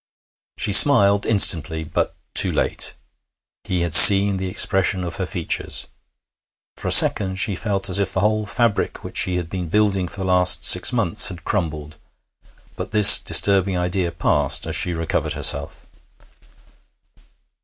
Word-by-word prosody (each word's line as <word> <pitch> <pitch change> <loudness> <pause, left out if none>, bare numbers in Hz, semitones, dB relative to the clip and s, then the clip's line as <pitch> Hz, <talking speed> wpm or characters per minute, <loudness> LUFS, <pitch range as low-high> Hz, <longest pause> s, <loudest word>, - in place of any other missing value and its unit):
She 105 - -3
smiled 100 -4 +4
instantly, 85 -6 +1
but 80 - -7 0.2
too - - +1
late; - - -3 0.7
he 90 -2 -6
had 85 -2 -6
seen 100 +2 +8
the 95 0 -8
expression 95 0 -2
of 85 -1 -10
her 95 - -7
features. 85 -4 -6 0.9
For - - -11
a - - -4
second 95 -2 +3
she 95 +1 -4
felt 100 0 -4
as 95 +1 0
if 100 -2 -5
the 95 - -5
whole 105 +1 -4
fabric 115 -1 -5
which - - -13
she 90 - -1
had 90 -2 -7
been 90 -1 -10
building 100 -2 -3
for 100 - -12
the 95 - -8
last 90 -3 +2
six 90 - +3
months 115 -9 +2
had 90 -3 -11
crumbled; 80 -6 -8 0.8
but - - -10
this 105 -2 +7
disturbing 95 -2 0
idea 90 0 -5
passed 75 -4 -3
as 80 0 -8
she 85 +1 -4
recovered 80 0 -6
herself. - - -1
95 Hz, 155 wpm, -16 LUFS, 85-100 Hz, 0.9 s, seen